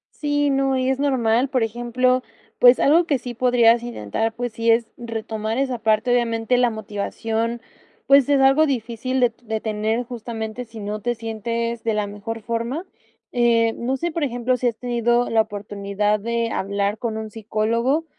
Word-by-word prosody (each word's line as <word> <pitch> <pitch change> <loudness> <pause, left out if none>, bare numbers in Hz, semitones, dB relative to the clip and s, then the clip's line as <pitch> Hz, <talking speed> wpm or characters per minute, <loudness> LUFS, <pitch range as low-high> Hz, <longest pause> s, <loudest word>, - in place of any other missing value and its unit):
Sí, 290 -1 0
no, 270 -1 +1
y 260 0 +1
es 265 - 0
normal, 255 -3 +2
por 255 -3 0
ejemplo, 240 +3 +1 0.4
pues, 245 0 +7
algo 325 +5 +4
que 280 -5 +1
sí 245 0 -6
podrías 235 -1 +4
intentar, 225 - -3
pues 245 -1 -4
sí 230 0 +1
es 230 0 +3
retomar 225 -1 -4
esa 260 -3 -1
parte, 220 +2 +1
obviamente 235 0 +1
la 245 -1 +4
motivación, 225 +2 -3 0.4
pues, 275 -1 +6
es 280 -1 +4
algo 270 +4 +5
difícil 255 0 -2
de 245 -2 +3
de 220 -2 -3
tener 220 +2 -1
justamente 230 -1 -6
sí 225 -1 -10
no 210 +1 -4
te 240 +3 -1
sientes 230 +1 -3
de 225 - +1
la 210 -1 0
mejor 215 +2 -6
forma. 235 - -3 0.5
Eh, 230 -2 +3
no 255 +3 -1
sé, 345 +5 -2
por 315 -2 -1
ejemplo, 245 0 0
¿sí 250 - -2
has 235 -2 0
tenido 240 0 +1
la 225 -1 +4
oportunidad 205 0 -2
de 230 +1 -1
hablar 200 +1 -1
con 225 -1 -3
un 220 -1 -5
psicólogo, 230 +7 0
235 Hz, 175 wpm, -22 LUFS, 220-250 Hz, 0.5 s, pues